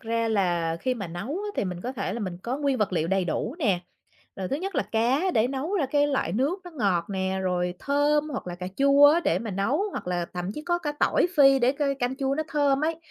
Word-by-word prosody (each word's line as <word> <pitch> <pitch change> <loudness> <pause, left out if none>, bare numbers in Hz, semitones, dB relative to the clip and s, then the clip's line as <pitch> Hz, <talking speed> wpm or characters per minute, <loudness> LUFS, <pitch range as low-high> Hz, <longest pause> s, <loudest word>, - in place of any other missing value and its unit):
ra 230 -1 -1
là 175 -6 +1
khi 255 -1 0
mà 205 -6 -5
nấu 175 +5 -6
á 390 +8 -3
thì - - 0
mình 180 -2 -4
có 250 +7 -4
thể 205 -7 -3
là 235 - -4
mình 185 -4 -4
có 245 +3 -2
nguyên 280 -2 0
vật 210 -2 0
liệu 165 -2 0
đầy 190 0 +1
đủ 220 - -2
nè, 200 - +1 0.6
rồi 190 -1 -4
thứ 275 - -1
nhất 380 +4 -5
là - - +2
cá 260 +11 +2
để 220 +3 +3
nấu 275 +8 -3
ra 325 -9 +1
cái 290 +2 +2
loại 270 - -1
nước 275 - 0
nó 355 - -9
ngọt 200 - 0
nè, 190 -1 -1
rồi 180 -1 -1
thơm 290 +1 +1
hoặc 260 - -5
là 175 - -4
cà 180 +1 -6
chua 280 +1 +6
á 310 +4 +5
để - - +2
mà 225 - -5
nấu, 200 - 0
hoặc - - -6
là 175 -1 -1
thậm 180 +2 -3
chí 300 - -7
có 345 +1 0
cả 295 -4 -3
tỏi - - +3
phi 275 -2 +7
để 250 +1 +3
c 280 - -18 0.2
canh 250 +1 -1
chua 270 -1 0
nó 310 - -1
thơm 285 -3 +2
ấy. 325 +1 0
250 Hz, 265 wpm, -26 LUFS, 190-290 Hz, 0.6 s, phi